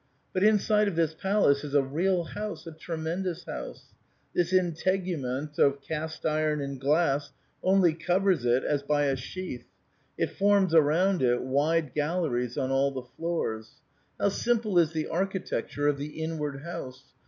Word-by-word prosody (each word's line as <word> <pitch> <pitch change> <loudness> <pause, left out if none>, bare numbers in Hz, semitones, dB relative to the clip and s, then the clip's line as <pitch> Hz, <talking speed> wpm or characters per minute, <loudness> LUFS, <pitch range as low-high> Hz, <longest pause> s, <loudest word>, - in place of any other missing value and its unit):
But 185 - 0
inside 210 0 +4
of 195 - -2
this 165 -2 +1
palace 190 -6 +2
is 145 -1 -4
a 140 - +5
real 175 +6 0
house, 210 -1 -6
a 165 - -7
tre 160 +1 -6
mendous 170 +2 -3
house! - - -8 0.4
This 175 0 +1
integument 170 -6 -1
of 140 0 +4
cast 160 +2 -5
iron 155 -1 +1
and 140 -2 -5
glass 145 0 +1 0.3
only 185 -3 +4
covers 180 -1 +1
it 125 +1 +2
as 145 -1 0
by 145 +1 +1
a 135 -1 +1
sheath; 135 +1 -6 0.5
it - - 0
forms 200 -3 +3
around 165 +5 +4
it 120 -1 +2
wide 145 +3 +1
galleries 145 -6 -1
on 135 -2 -1
all 135 +1 +3
the 130 -2 -6
floors. 135 -10 -3 0.5
How 200 - +3
simple 220 -3 +1
is 165 -2 +3
the 160 -2 -2
architecture 185 -5 -2
of 145 -1 +1
the 150 +2 -6
inward 150 -3 -3
house 140 -6 -8
160 Hz, 160 wpm, -28 LUFS, 140-185 Hz, 0.5 s, a